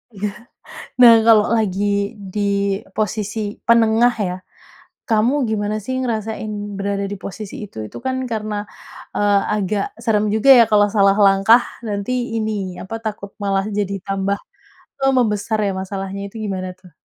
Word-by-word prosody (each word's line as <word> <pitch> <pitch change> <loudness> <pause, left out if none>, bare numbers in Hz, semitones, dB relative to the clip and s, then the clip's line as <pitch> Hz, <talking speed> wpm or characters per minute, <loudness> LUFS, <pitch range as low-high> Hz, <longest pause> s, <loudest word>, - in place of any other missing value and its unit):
Iya. 205 +1 -2 0.8
Nah, 235 -1 +10
kalau 215 -2 +5
lagi 200 -2 0 0.2
di 210 - -2 0.5
posisi 215 +1 -2 0.3
penengah, 230 +1 +4
ya. 180 - -3 0.8
Kamu 225 +3 +3 0.2
gimana 210 -1 -1
sih, 260 +5 -3
ngerasain 220 -3 -3 0.3
berada 200 0 -2
di 205 - -4
posisi 200 +1 -7
itu? 200 - -16
Itu - - -10
kan 260 0 0 0.2
karena, 215 -1 -3 0.6
eee, 205 -1 +3 0.2
agak 200 0 -1 0.2
serem 215 -2 +2
juga, 220 +5 +2
ya. - - +9
Kalau 205 -1 +5
salah 200 -1 +3
langkah 195 +5 +5 0.3
nanti 200 +3 -3 0.3
ini, 205 -4 -3
apa 210 +4 -6
takut 205 -2 -5
malah 195 -1 0
jadi 200 -1 -1
tambah, 195 0 -1 0.7
eee, 270 - +4
membesar 215 -2 0
ya, - - 0
masalahnya. 195 0 -5
Itu - - -24
gimana, 185 -2 -3
tuh? 185 -1 -18
205 Hz, 145 wpm, -19 LUFS, 195-220 Hz, 0.8 s, Nah